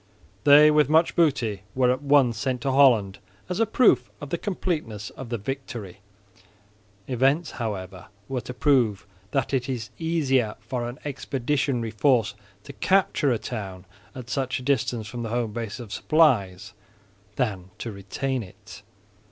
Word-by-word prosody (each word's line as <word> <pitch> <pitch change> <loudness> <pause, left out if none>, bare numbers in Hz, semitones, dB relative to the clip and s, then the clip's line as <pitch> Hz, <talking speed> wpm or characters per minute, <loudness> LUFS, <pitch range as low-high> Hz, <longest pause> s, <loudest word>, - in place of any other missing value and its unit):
They, 150 +1 +8
with 150 -2 +3
much 160 +2 +3
booty, 130 - +1
were 125 -1 +3
at 130 +2 -2
once 140 -4 +4
sent 130 +1 -2
to 135 - 0
Holland 120 -8 +4 0.3
as 180 - -2
a 225 - +3
proof 240 +2 +3
of 145 - -8
the 170 - 0
completeness 150 - -3
of 130 -3 -9
the 120 - -2
victory. 115 -5 -6 1.1
Events, 135 +6 +1
however, 95 -5 -5 0.2
were 130 -2 -3
to 125 - -7
prove 125 -8 +2 0.2
that 135 +2 -1
it 130 0 0
is 115 -6 -4
easier 135 -9 +1
for 120 +2 -4
an 120 - -9
expeditionary 135 -3 -1
force 115 0 +2 0.3
to 140 - -10
capture 185 -4 +2
a 120 - +1
town 95 -6 -6 0.3
at 125 -2 -8
such 130 0 -1
a - - -9
distance 125 -4 0
from 120 +2 -6
the 115 - -4
home 115 -2 -2
base 115 0 -5
of 115 -4 -8
supplies, 105 - +2 0.6
than 100 -8 -2
to 115 - -5
retain 120 +7 -3
it. 95 0 -12
125 Hz, 155 wpm, -25 LUFS, 110-140 Hz, 1.1 s, They